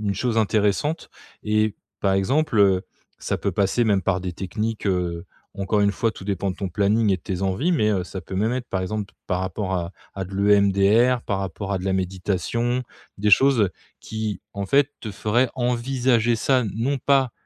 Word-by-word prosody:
une 100 -2 -1
chose 115 +3 0
intéressante 110 - +1 0.3
et 110 0 +1 0.3
par 95 -1 +2
exemple, 115 +5 +1
heu, 95 -2 +4 0.4
ça - - -2
peut - - -1
passer 105 +4 +1
même 100 -3 +2
par 95 -1 0
des 90 -1 -4
techniques, 105 +4 -3
heu, 90 -3 -1 0.3
encore 100 +2 +1
une 100 0 +3
fois 115 +3 0
tout 95 - -11
dépend 100 -1 -1
de - - -14
ton 100 - -3
planning 105 +3 +2
et 95 - 0
tes 90 +2 -4
envies 95 - +1
mais, 110 -10 +2
heu, 95 -4 0
ça 95 0 -7
peut 95 - -8
même 110 +4 +1
être, 125 -1 -3
par 95 - -1
exemple, 105 +1 -4
par 90 0 -1
rapport 95 +1 -3
à 85 0 -3 0.2
à 95 -1 -3
de 95 +2 -9
l'EMDR 100 +4 +4
par 100 -2 -1
rapport 95 +2 -4
à 95 - 0
de 90 - -7
la 95 - 0
méditation, 95 +6 -1 0.4
des 105 +1 +1
choses 120 -1 +5 0.3
qui 110 -4 -4
en 100 0 -3
fait, 140 +6 +3
te 110 - -5
ferait 110 +5 +1
envisager 120 -1 +1
ça, 130 +3 +2
n 110 -5 -2
non 130 +6 0
pas 135 -2 +2
105 Hz, 200 wpm, -23 LUFS, 95-120 Hz, 0.4 s, choses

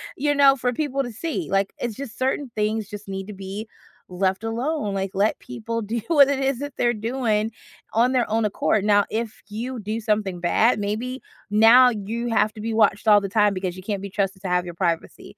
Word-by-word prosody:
you 290 +1 +1
know, 275 -1 +6
for 245 -1 -1
people 275 -1 -1
to 245 - -6
see. 325 - -4
Like, 195 0 +1
it's 235 -4 -3
just 260 -6 -8
certain 265 0 -1
things 215 0 -1
just 205 0 -9
need 195 0 -5
to 210 - -7
be 195 +3 -7 0.4
left 190 +2 -1
alone, 230 0 -2
like, 195 -1 -2
let 200 +3 +1
people 230 -2 -5
do 220 +2 -3
what 285 -5 +6
it 280 -1 0
is 270 -2 0
that 285 -1 -5
they’re 240 0 +2
doing 225 -2 0 0.4
on 235 +3 +3
their 250 -2 +1
own 225 +1 +1
accord. 210 0 +1
Now 205 -1 +4
if 225 0 -4
you 240 +4 -5
do 215 +2 -4
something 210 -5 -1
bad, 215 +6 +3
maybe 225 +6 -3 0.3
now 225 +4 +7
you 225 +3 -4
have 215 -2 +2
to 215 - -8
be 225 +1 -3
watched 215 -1 +2
all 210 -1 +7
the 195 - -4
time 210 0 +3
because 185 -1 -4
you 185 - -9
can't 200 -1 -3
be 200 - -6
trusted 195 -1 -2
to 185 - -3
have 180 0 +1
your 175 - -7
privacy, 170 -2 -3
220 Hz, 220 wpm, -23 LUFS, 200-245 Hz, 0.4 s, now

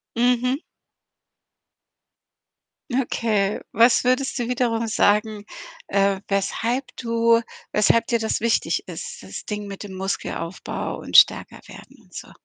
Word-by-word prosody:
Mhm. 250 +3 +2 2.3
Okay. 220 -5 0
Was 235 +4 +4
würdest 260 +2 +1
du 240 -1 -2
wiederum 235 -2 0
sagen, 210 0 +1 0.4
äh, 195 0 +1
weshalb 235 +6 -1
du 230 -1 +2 0.3
weshalb 225 +2 +3
dir 235 -2 +1
das 220 -1 -1
wichtig 230 0 0
ist, 485 0 -8
das - - -8
Ding 210 -1 -4
mit 200 -1 -8
dem 195 -2 -8
Muskelaufbau 190 -2 -4
und - - +2
stärker - - +4
werden - - -14
und - - -26
so? - - -9
230 Hz, 120 wpm, -23 LUFS, 205-245 Hz, 2.3 s, Was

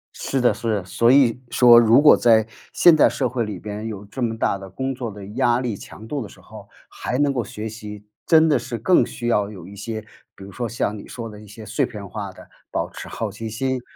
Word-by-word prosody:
是 135 - -2
的 125 -1 +3
是 115 - -6
的， 95 -3 -4
所 115 +6 +2
以 130 -3 +4
说 120 -2 +7
如 115 +2 +6
果 150 - +8
在 110 -2 +4 0.2
现 175 -2 +6
代 155 - +5
社 130 - -1
会 120 -1 -2
里 105 -2 -5
边 105 +1 -6
有 105 -2 -7
这 125 +6 -8
么 115 -1 -1
大 100 - 0
的 95 - -10
工 130 +8 -3
作 125 -3 -5
的 100 -1 -10
压 120 +3 +1
力 120 -4 -2
强 110 +2 -12
度 140 +2 -3
的 105 - -7
时 - - -17
候， - - -13 0.2
还 125 - -4
能 145 0 +2
够 125 -3 -1
学 105 +2 -7
习， 105 -1 -9 0.2
真 160 0 +6
的 150 - +3
是 120 -2 -5
更 175 - +4
需 120 - -7
要 105 -3 +1
有 90 -5 -10
一 100 - -11
些 110 +2 -5 0.3
比 95 - -12
如 100 - -10
说 120 +4 -4
像 110 -2 -2
你 - - -11
说 115 -2 -7
的 105 -1 -11
一 105 - -14
些 110 +2 -11
碎 105 +1 -1
片 105 -2 -8
化 100 0 -6
的， - - -15 0.2
保 - - -2
持 - - -9
好 110 -2 -4
奇 110 +2 -6
心， 130 +3 -2
115 Hz, 270 characters per minute, -22 LUFS, 105-125 Hz, 0.3 s, 果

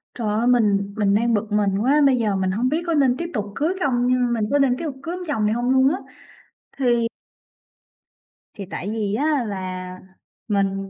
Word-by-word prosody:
Trời 230 -3 -3
ơi, 220 +3 0
mình 205 -5 +2
mình 200 -2 +2
đang 230 +3 +2
bực 210 0 -1
mình 205 -2 +1
quá, 280 +6 +3
bây 265 -2 +4
giờ 215 -4 0
mình 190 -1 0
hông 235 +6 0
biết 315 +5 -1
có 335 - +1
nên 270 -4 +3
tiếp 340 - -3
tục 210 - -2
cưới 315 +5 0
không, 245 -2 +1
nhưng 250 -1 +2
mình 220 -3 0
có 285 - +3
nên 260 -3 +2
tiếp 330 - -5
tục 290 -4 -4
cưới 335 +3 -4
ông 365 - -6
chồng 250 -9 0
này 210 - +2
hông 240 +2 -1
luôn 260 0 +4
á, 320 - -1 0.8
thì 240 -3 +2 1.5
thì 200 - -7
tại 195 - -5
vì 215 -3 -2
á 290 0 +1
là 185 -2 -5 0.5
mình 195 -2 -1
235 Hz, 215 wpm, -22 LUFS, 205-265 Hz, 1.5 s, bây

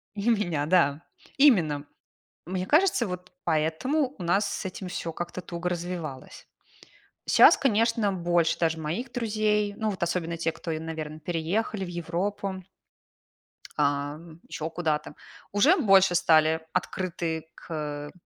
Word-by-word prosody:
И 205 +3 -2
у - - +6
меня, 165 -8 -1
да. 160 -3 +3 0.3
Именно. 165 - +4 0.6
Мне 185 0 -3
кажется, 305 - +3
вот 180 0 -7
поэтому 175 - 0
у - - -6
нас 175 +5 +2
с - - -4
этим 185 0 -6
всё 165 -2 -4
как-то 175 +2 -5
туго 175 0 -4
развивалось. 170 -6 -6 0.8
Щас, - - +8
конечно, 230 -4 +2
больше 175 -2 +1
даже 165 -1 +1
моих 210 +12 -4
друзей, 210 -3 0
ну, 220 -1 -1
вот 185 -4 -3
особенно 170 -1 -2
те, 165 0 0
кто, 165 - -6
и, 155 - -2
наверно, 155 -1 -6
переехали 180 +5 -2
в - - -8
Европу 185 +3 -3 1.1
а, 145 0 0 0.3
ещё 160 +1 -4
куда-то. 160 -3 -2 0.4
Уже 285 - +5
больше 195 - +5
стали 160 -1 +4
открыты 170 -3 -2
к 150 -2 -5
175 Hz, 135 wpm, -27 LUFS, 160-205 Hz, 1.1 s, Щас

